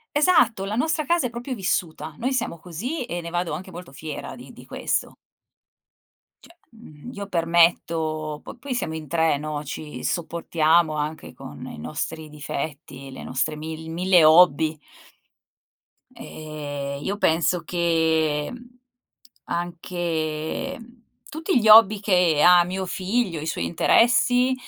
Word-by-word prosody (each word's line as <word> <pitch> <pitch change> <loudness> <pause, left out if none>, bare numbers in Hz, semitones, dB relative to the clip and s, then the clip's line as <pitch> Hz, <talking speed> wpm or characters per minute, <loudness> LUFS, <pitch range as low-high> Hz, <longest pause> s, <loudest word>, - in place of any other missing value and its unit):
Esatto, 250 - +3
la 205 - -3
nostra 310 +5 0
casa 340 -3 +2
è - - -9
proprio 240 +2 -5
vissuta. 170 -5 -2
Noi 260 +3 -1
siamo 235 -9 -2
così 235 - -5
e 175 -4 -4
ne 170 - -7
vado 175 0 -2
anche 185 +1 -7
molto 170 -5 -10
fiera 150 +1 -7
di - - -12
di - - -14
questo. - - -2 1.3
Cioè, 340 - -18 0.2
mhmm, 220 -3 -12
io 200 0 -6
permetto 165 -3 +1
po - - -9
poi 260 +2 -6
siamo 160 -10 -3
in 155 -1 -7
3, 160 0 +2
no, 150 0 -4
ci 150 -2 -7
sopportiamo 165 -1 +1
anche 150 +1 -4
con - - -10
i - - -9
nostri 155 - -5
difetti, 140 -2 -6
le 130 - -9
nostre 150 +4 -2
mil 160 +1 -7
mille 180 0 +4
hobby. 160 -1 +5 1.4
Ehm, 145 -2 -6
io 200 +1 -2
penso 170 -1 +2
che, 160 -3 +1
mhmm, 245 0 -13 0.7
anche 170 - -3 0.5
tutti 325 +3 -1
gli 220 - 0
hobby 215 -1 +8
che 180 -7 +3
ha 175 -1 +7
mio 190 +2 -3
figlio, 185 -1 -1
i 155 - -6
suoi 160 - -2
interessi 245 +7 +3
170 Hz, 140 wpm, -24 LUFS, 155-205 Hz, 1.4 s, hobby